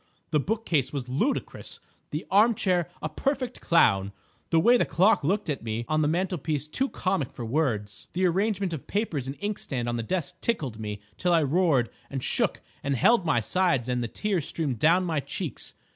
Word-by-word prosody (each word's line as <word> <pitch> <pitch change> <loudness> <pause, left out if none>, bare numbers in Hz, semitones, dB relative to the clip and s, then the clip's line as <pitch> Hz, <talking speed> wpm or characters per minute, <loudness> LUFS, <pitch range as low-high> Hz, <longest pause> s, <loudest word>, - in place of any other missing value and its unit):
The 150 - +3
bookcase 165 - 0
was 135 -4 -4
ludicrous, 150 - -2 0.3
the 150 +3 -4
arm 215 +4 +5
chair 180 -4 +1
a - - +1
perfect 265 -3 -2
clown, 100 - +3 0.4
the 165 - +4
way 240 +9 +6
the 245 - +4
clock 180 +4 +3
looked 195 +7 0
at 145 -4 -2
me 115 +1 -3
on 155 0 +1
the 150 - +2
mantelpiece 160 -3 -1
too 265 - -1
comic 185 -8 -1
for 120 - -6
words; 110 -6 -1
the 185 +1 +1
arrangement 195 0 +1
of 155 - -6
papers 170 - -1
and 135 - -5
inkstand 195 - -3
on 120 0 -1
the - - -1
desk 155 +5 -3
tickled 140 - -1
me 105 -1 -5 0.2
till 180 -1 +2
I 165 -2 +4
roared 145 -4 +2 0.2
and 135 -2 -4
shook - - 0 0.2
and 140 0 0
held 185 - +4
my 145 -7 +3
sides 170 - +1
and 125 -1 0
the - - -2
tears 190 - -1
streamed 140 -8 -1
down 170 +7 +4
my 160 -4 0
cheeks. - - -5
160 Hz, 190 wpm, -27 LUFS, 130-190 Hz, 0.4 s, way